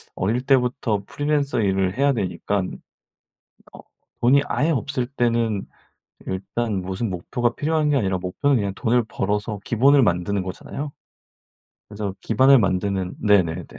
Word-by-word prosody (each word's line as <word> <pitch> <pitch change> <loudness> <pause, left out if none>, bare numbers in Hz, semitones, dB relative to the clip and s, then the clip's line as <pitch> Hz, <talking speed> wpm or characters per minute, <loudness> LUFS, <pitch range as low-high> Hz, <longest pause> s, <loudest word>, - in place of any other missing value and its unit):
어릴 110 +7 0
때부터 125 -5 +1
프리랜서 145 -4 0
일을 95 +1 0
해야 140 0 +3
되니깐 100 -2 -2 1.0
어 - - -12 0.4
돈이 130 +4 +5
아예 160 +3 +1
없을 140 -3 -1
때는 115 -5 0 0.6
일단 100 +2 -3
무슨 95 +4 -3
목표가 120 +7 -1
필요한 155 0 0
게 145 - +3
아니라 95 -5 0
목표는 130 +11 0
그냥 100 -2 -2
돈을 120 +3 +1
벌어서 105 +1 -2
기본을 135 +5 +4
만드는 95 +1 0
거잖아요. 140 +10 -6 1.0
그래서 105 -2 -5
기반을 130 +4 +5
만드는 95 -1 -1
네네네. 90 -5 +2
110 Hz, 310 characters per minute, -22 LUFS, 95-135 Hz, 1.0 s, 돈이